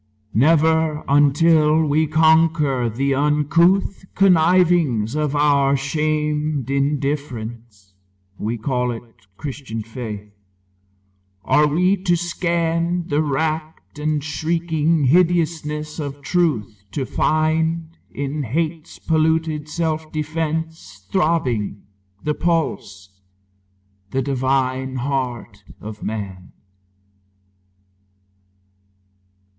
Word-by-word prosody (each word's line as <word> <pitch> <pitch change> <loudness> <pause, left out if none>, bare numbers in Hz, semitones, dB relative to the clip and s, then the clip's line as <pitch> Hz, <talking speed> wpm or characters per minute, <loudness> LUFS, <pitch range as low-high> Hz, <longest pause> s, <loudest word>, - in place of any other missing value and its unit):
Never 160 +3 +3
until 150 +2 +4
we 155 +2 +2
conquer 155 -5 +3
the 135 +5 0
uncouth 150 +8 +2
Connivings 170 - +3
of 150 -1 -1
our 140 -1 +3
shamed 150 -1 -1
indifference 125 -8 -3 0.5
(We 115 +3 -2
call 125 +2 -1
it 115 -1 -5 0.3
Christian 130 -6 -6
faith) 105 -3 -7 1.1
are 150 0 +4
we 180 +6 +2
to 180 -2 +1
scan 170 0 -1
The 145 0 +2
racked 155 +1 -3
and 150 -1 -1
shrieking 160 0 0
hideousness 155 -1 +1
of 145 -1 -6
Truth 125 - -1
To 135 - -2
find, 160 +3 0
in 140 +2 -4
hate's 155 +5 -3
polluted 160 -1 0
self 160 -1 -2
defence 155 - -4
Throbbing, 130 - 0 0.4
the 150 - 0
pulse, 100 - -2 0.9
the 135 +3 -1
divine 130 -1 -1
heart 125 -5 -3 0.2
of 105 0 -9
man. 100 -4 -6
150 Hz, 85 wpm, -21 LUFS, 130-160 Hz, 1.1 s, until